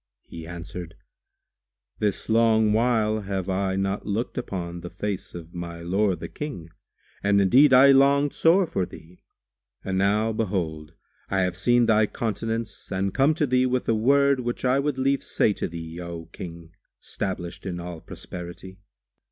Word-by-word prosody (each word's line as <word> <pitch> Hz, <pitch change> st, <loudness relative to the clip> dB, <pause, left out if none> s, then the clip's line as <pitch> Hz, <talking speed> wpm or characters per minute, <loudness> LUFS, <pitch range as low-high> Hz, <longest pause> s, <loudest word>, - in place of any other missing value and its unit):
He 80 Hz, -1 st, -10 dB
answered, 85 Hz, 0 st, -8 dB, 1.0 s
"This 105 Hz, -2 st, -1 dB
long 110 Hz, -1 st, +4 dB
while 110 Hz, -2 st, +2 dB
have 95 Hz, -3 st, -3 dB
I 95 Hz, 0 st, 0 dB
not 95 Hz, +1 st, -1 dB
looked 110 Hz, +4 st, -2 dB
upon 85 Hz, -7 st, -4 dB
the 90 Hz, -, -7 dB
face 100 Hz, -2 st, -5 dB
of 85 Hz, -1 st, -9 dB
my 85 Hz, -1 st, -6 dB
lord 95 Hz, +1 st, 0 dB
the -, -, -4 dB
King 110 Hz, -, -7 dB, 0.5 s
and 100 Hz, 0 st, +3 dB
indeed 130 Hz, +9 st, +6 dB
I 135 Hz, +2 st, +8 dB
longed 140 Hz, +1 st, +4 dB
sore 180 Hz, +4 st, +4 dB
for 155 Hz, -, -2 dB
thee; 90 Hz, 0 st, -14 dB, 0.6 s
and 95 Hz, 0 st, -1 dB
now, 105 Hz, +3 st, +2 dB
behold, 85 Hz, -8 st, -3 dB, 0.4 s
I 95 Hz, 0 st, +1 dB
have 90 Hz, -1 st, 0 dB
seen 120 Hz, +6 st, +3 dB
thy 110 Hz, -1 st, +4 dB
countenance 115 Hz, -1 st, -4 dB
and 95 Hz, 0 st, -1 dB
come 140 Hz, +4 st, +3 dB
to 150 Hz, -, +1 dB
thee 130 Hz, -1 st, +2 dB
with 125 Hz, 0 st, -1 dB
a -, -, +3 dB
word 140 Hz, +4 st, +3 dB
which 120 Hz, +1 st, -3 dB
I 130 Hz, +2 st, +3 dB
would 140 Hz, -1 st, -1 dB
lief 135 Hz, +1 st, +1 dB
say 105 Hz, -, +1 dB
to -, -, -3 dB
thee, 80 Hz, 0 st, -7 dB
O 85 Hz, -1 st, -7 dB
King 85 Hz, -2 st, -9 dB, 0.3 s
stablished 95 Hz, -1 st, -5 dB
in 90 Hz, -2 st, -4 dB
all 85 Hz, -2 st, -7 dB
prosperity!" 90 Hz, +2 st, -9 dB
100 Hz, 160 wpm, -25 LUFS, 90-120 Hz, 1.0 s, I